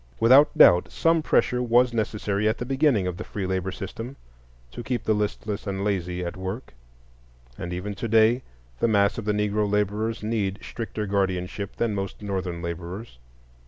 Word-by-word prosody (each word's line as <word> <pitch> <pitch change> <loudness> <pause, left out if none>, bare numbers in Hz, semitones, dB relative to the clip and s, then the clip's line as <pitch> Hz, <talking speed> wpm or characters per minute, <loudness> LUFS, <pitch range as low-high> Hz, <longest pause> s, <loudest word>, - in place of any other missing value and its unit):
Without 130 +6 +6
doubt, 90 0 +6
some 165 0 +2
pressure 125 -4 +2
was 120 0 +3
necessary 105 -2 0
at 110 - -1
the 120 - -4
beginning 135 -6 +2
of 90 -1 -3
the - - -5
free 100 -2 -5
labor 95 0 -1
system 115 +7 -7 0.6
to - - -7
keep 120 +1 -3
the 110 - +2
listless 105 0 -3
and 100 0 -2
lazy 90 -3 -1
at 85 +3 -4
work; 95 - -6 0.8
and 90 - -6
even 90 +4 -4
to 115 - -4
day 115 +3 +4 0.4
the - - +3
mass 100 -1 +2
of 110 - -6
the 105 - +2
Negro 105 0 0
laborers 105 +2 -1
need 105 -3 -1
stricter 110 -2 -5
guardianship 95 0 -2
than 115 -2 0
most 100 +1 -5
Northern 95 -4 -3
laborers. 85 - -6
105 Hz, 170 wpm, -25 LUFS, 95-115 Hz, 0.8 s, Without